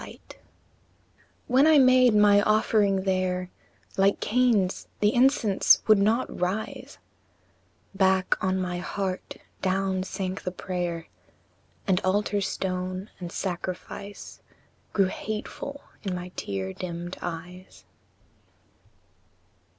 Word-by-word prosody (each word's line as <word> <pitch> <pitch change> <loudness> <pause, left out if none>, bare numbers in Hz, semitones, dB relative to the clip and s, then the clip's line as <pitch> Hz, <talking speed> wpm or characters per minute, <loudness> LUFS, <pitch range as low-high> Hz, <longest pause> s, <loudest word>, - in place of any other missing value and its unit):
Yet - - -13 1.1
when 265 +4 +4
I 315 -1 +6
made 255 -3 +6
my 205 -1 +6
offering 210 -2 +2
there, 185 -1 -1 0.5
Like 195 +1 +3
Cain's, 225 -6 +1
the 210 0 +3
incense 240 -6 +4
would 215 -2 +5
not 220 +5 +1
rise; 185 +5 -3 1.0
Back 190 -1 +2
on 190 0 +1
my 180 -1 -2
heart 185 +1 -4 0.3
down 190 0 0
sank 190 0 -4
the - - -3
prayer, 175 -2 -4 0.8
And 185 -2 +2
altar 205 +2 0
stone 185 0 -3
and 175 -2 -6
sacrifice 185 +2 -6 0.5
Grew 195 - +3
hateful 215 +8 -5 0.2
in 190 -4 -3
my 180 0 -6
tear 95 - -4
dimmed 175 - -6
eyes. 180 +2 -8
190 Hz, 105 wpm, -26 LUFS, 180-210 Hz, 1.1 s, I